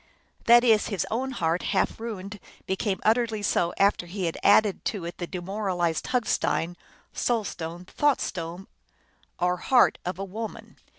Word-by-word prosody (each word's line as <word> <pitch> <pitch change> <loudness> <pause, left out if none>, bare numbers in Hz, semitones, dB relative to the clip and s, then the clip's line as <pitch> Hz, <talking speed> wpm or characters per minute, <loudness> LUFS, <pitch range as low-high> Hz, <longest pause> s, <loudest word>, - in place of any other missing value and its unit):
That 240 +1 +7
is, 220 -3 +4
his 200 -4 -1
own 255 +4 -1
heart, 170 -8 0 0.2
half - - +1
ruined, 205 -3 -6 0.3
became 190 +1 -1
utterly 225 -1 +2
so 175 -3 +1
after 195 -3 +2
he 185 +1 -3
had 165 - -3
added 205 -1 +4
to 195 -6 -2
it 170 - -7
the 175 - -3
demoralized 180 -3 -2
hug 250 -3 +1
stein, 175 +2 0 0.4
soul 235 -3 0
stone, 175 -1 -6
thought 290 +7 +1
stone, 175 +1 -5 0.7
or 180 0 +1
heart 250 +7 +4
of 180 0 -3
a 195 - -4
woman. 215 +3 -7
195 Hz, 160 wpm, -26 LUFS, 175-225 Hz, 0.7 s, That